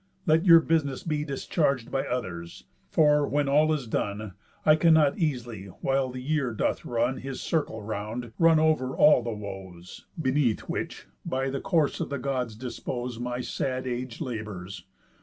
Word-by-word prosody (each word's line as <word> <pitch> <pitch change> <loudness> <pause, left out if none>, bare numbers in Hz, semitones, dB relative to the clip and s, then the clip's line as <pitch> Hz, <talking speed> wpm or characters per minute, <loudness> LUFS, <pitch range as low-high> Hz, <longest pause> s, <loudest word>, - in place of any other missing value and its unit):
Let 165 +3 +3
your 165 -1 +9
business 155 -5 0
be 150 -3 -1
Discharg'd 140 -2 -1
by 135 - -1
others; 90 -9 -5 0.3
for, 150 -2 +4
when 145 0 +1
all 150 +3 +4
is 150 -5 -1
done, 105 -2 -3 0.3
I 155 - +7
cannot 160 -1 +4
easily, 120 - -2
while 135 +7 -1
the 125 0 -6
year 140 -4 0
doth - - -1
run 120 +2 0
His 135 -1 -6
circle 145 -9 -2
round, 110 +3 -5
run 165 -1 +6
over 155 -5 +2
all 150 -4 +6
the 120 - -4
woes, 95 -5 -8
Beneath 130 -5 +1
which, - - -5 0.2
by 135 +1 -1
the 135 - -3
course 165 -7 +1
the 140 - -2
Gods 125 -4 -2
dispose, 125 0 -5
My 125 0 -3
sad 130 +1 -3
age 125 -1 -4
labours. 105 - -6
130 Hz, 160 wpm, -27 LUFS, 115-150 Hz, 0.3 s, your